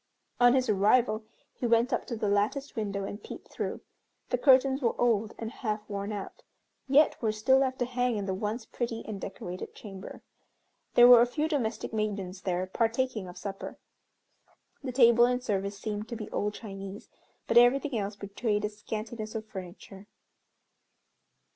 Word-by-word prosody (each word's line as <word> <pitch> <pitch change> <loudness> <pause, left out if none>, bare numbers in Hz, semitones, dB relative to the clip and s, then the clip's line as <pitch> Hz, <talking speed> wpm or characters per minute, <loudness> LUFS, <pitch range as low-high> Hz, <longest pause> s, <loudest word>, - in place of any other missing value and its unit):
On 245 +1 +6
his 260 -1 +2
arrival 215 +2 +3 0.3
he 245 - -2
went 235 +3 +3
up 245 - -1
to 235 - -3
the 215 -1 -2
latticed 210 +8 0
window 200 -3 -2
and 205 +2 -6
peeped - - -10
through. - - -4 0.5
The - - +2
curtains 265 +1 +5
were 235 - 0
old 225 -3 +1
and 225 0 -5
half 215 -4 -4
worn 200 0 -4
out, 205 -2 -6 0.5
yet 285 +3 +4
were 220 -2 +1
still 240 +5 +3
left 260 -1 0
to 245 - 0
hang 245 -2 0
in 200 - -3
the 190 - -1
once 215 +4 -3
pretty 235 -1 -4
and 205 -3 -6
decorated 180 -2 -7
chamber. 195 -2 -10 0.7
There 240 0 +9
were 245 -1 +9
a 240 - +4
few 300 +5 -1
domestic 240 -8 -2
maidens 200 -3 -3
there 180 0 -1
partaking 230 +1 -1
of 180 - -10
supper. 195 -1 -6 1.1
The 260 - -3
table 235 -1 +6
and 250 0 0
service 200 -3 -2
seemed 210 +1 -4
to 235 - -4
be 215 -2 -7
old 210 0 -1
Chinese, 195 -1 -8 0.4
but - - +6
everything 270 +3 +3
else 205 -1 -2
betrayed 205 +1 -2
a - - -1
scantiness 215 +1 -6
of 220 -1 -4
furniture. 190 0 -10
220 Hz, 170 wpm, -29 LUFS, 205-245 Hz, 1.1 s, There